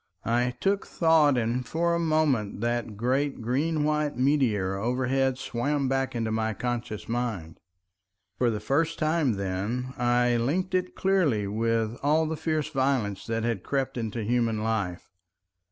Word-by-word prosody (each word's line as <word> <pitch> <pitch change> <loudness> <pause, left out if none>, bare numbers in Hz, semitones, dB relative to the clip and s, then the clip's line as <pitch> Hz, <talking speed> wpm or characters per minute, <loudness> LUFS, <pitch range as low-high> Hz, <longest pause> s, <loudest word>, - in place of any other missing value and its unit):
I 120 +2 +1
took 200 0 0
thought, 160 -5 +4
and 120 +2 0
for 170 +7 0
a 170 - +1
moment 155 -11 +1
that 120 -2 -2
great 135 +5 0
green 145 +7 0
white 150 -1 0
meteor 125 -8 +2
overhead 130 +4 0
swam 135 +3 -1
back 135 -1 -1
into 115 -2 -1
my 110 0 -1
conscious 120 -2 -4
mind. 115 -9 -3 0.8
For 125 - +3
the 110 -2 -2
first 155 +9 0
time 155 -5 +1
then 100 +7 -3
I 120 0 +3
linked 170 +11 -1
it 185 0 0
clearly 170 - +2
with 115 +2 -1
all 155 +3 +3
the 160 +1 -2
fierce 155 -1 -1
violence 130 -8 0
that 115 0 -1
had 115 -5 -1
crept 135 +3 -2
into 115 -1 -3
human 115 -1 0
life. 105 -6 -2
125 Hz, 150 wpm, -27 LUFS, 115-150 Hz, 0.8 s, thought